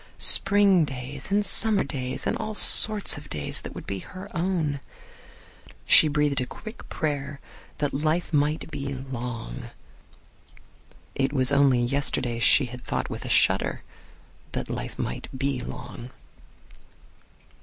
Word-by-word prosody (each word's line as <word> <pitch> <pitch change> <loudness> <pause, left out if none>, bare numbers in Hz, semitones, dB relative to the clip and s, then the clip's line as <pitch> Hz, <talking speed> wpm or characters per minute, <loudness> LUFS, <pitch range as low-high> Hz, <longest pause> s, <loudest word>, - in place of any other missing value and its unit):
Spring 200 -3 +5
days, 135 +1 -7
and 205 +1 +1
summer 220 -1 +2
days, 130 -2 -5
and - - -1
all 215 0 -5
sorts 210 -4 +6
of 145 - -16
days 75 -1 -3
that - - -10
would - - -9
be 100 - -5
her 185 - -11
own. 165 -5 -2 1.1
She 155 - +8
breathed 145 -2 0
a 125 - -4
quick 220 +2 -11
prayer 140 -2 -4 0.4
that 145 -1 -2
life 155 +4 -2
might 150 +2 -1
be 140 -1 -5
long. 125 - -7 1.4
It 135 0 -1
was 130 -2 +3
only 140 -3 +3
yesterday 125 -2 -1
she 130 +4 +4
had 125 +1 -10
thought - - -4
with - - -7
a - - -6
shudder - - +1 0.7
that - - -4
life - - -6
might - - -5
be 135 -1 -2
long. 120 0 -9
140 Hz, 135 wpm, -25 LUFS, 130-165 Hz, 1.4 s, She